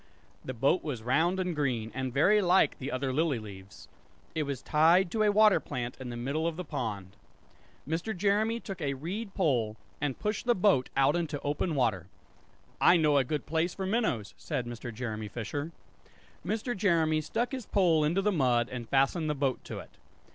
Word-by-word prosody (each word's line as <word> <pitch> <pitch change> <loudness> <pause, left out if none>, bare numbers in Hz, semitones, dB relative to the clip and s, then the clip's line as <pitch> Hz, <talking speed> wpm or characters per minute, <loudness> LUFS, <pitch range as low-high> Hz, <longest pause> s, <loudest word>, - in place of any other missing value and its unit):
The 130 - -5
boat 135 +9 +2
was 130 -8 -4
round 160 +10 +2
and 180 -2 -1
green, 125 -7 -1
and 130 0 -3
very 190 - +4
like 185 0 +3
the 140 +2 -4
other 130 0 -2
lily 155 -2 +1
leaves. 100 -3 -11 0.5
It 160 - -1
was 135 -3 -4
tied 170 +4 +4
to 220 - 0
a 210 -1 +4
water 215 0 +5
plant 120 -1 -5
in 130 -2 -6
the 120 - -5
middle 140 +7 -1
of 165 - -2
the 180 +1 -5
pond. 100 -8 -4 0.7
Mr. 170 +7 -2
Jeremy 210 +4 +1
took 195 -6 -7
a 140 -2 -1
reed 195 +9 -5
pole, 120 - +1 0.2
and 145 -3 -1
pushed 210 +3 -3
the 240 - +4
boat 180 -9 +3
out 135 +3 +4
into 165 -4 -2
open 150 +3 -1
water. 110 -10 0 0.7
"I 175 - +7
know 150 -3 +3
a - - +3
good 145 +2 -3
place 165 +3 -1
for 190 - -3
minnows," 190 - -1
said 140 -6 -3
Mr. 120 0 -6
Jeremy 110 -2 -5
Fisher. 140 - -4 0.7
Mr. 220 +7 -2
Jeremy 165 -6 +2
stuck 235 +10 -2
his 260 -5 -5
pole 170 -6 +3
into 170 +6 +1
the 210 - +2
mud 125 -8 +2
and 120 -3 -6
fastened 140 +4 +2
the 150 - 0
boat 135 -2 -1
to - - -6
it. - - -12
150 Hz, 190 wpm, -29 LUFS, 125-185 Hz, 0.7 s, I